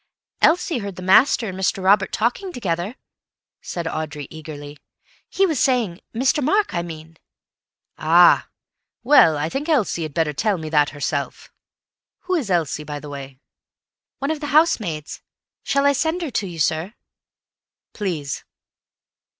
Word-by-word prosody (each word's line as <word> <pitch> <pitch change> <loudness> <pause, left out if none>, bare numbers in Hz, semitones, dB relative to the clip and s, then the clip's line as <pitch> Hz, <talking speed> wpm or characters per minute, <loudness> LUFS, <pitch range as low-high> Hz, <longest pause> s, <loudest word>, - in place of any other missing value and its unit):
"Elsie 330 -3 +3
heard 200 -3 -6
the 185 - -8
master 220 +5 +4
and 185 - -6
Mr. 190 0 0
Robert 195 +1 +4
talking 245 - -1
together," 190 - -3 0.7
said 170 -2 -5
Audrey 155 -3 -4
eagerly. 150 -2 -9 0.5
"He 390 - +2
was 315 -8 0
saying—Mr. 250 - 0
Mark, 405 +9 +1
I 170 - 0
mean—" 165 -1 -9 0.8
"Ah! 170 +3 +5 0.6
Well, 240 - +6
I 145 +1 -1
think 280 - -4
Elsie 230 - +1
had 155 -3 -5
better 160 -3 +1
tell 205 +6 0
me 160 -2 -6
that 150 -2 +3
herself. 145 -1 -4 0.7
Who 370 - -3
is 295 - -1
Elsie, 165 -4 0
by 150 -1 -6
the 150 - -10
way?" 135 -2 -8 0.8
"One 275 +2 -2
of 315 - -3
the 295 - -5
housemaids. 225 - +1 0.4
Shall 280 0 +1
I 285 - +5
send 320 +6 -1
her 305 - -4
to 205 -4 -1
you, 175 -2 -8
sir?" 160 +7 -1 1.0
"Please." 160 -9 -4
185 Hz, 145 wpm, -21 LUFS, -, 1.0 s, Well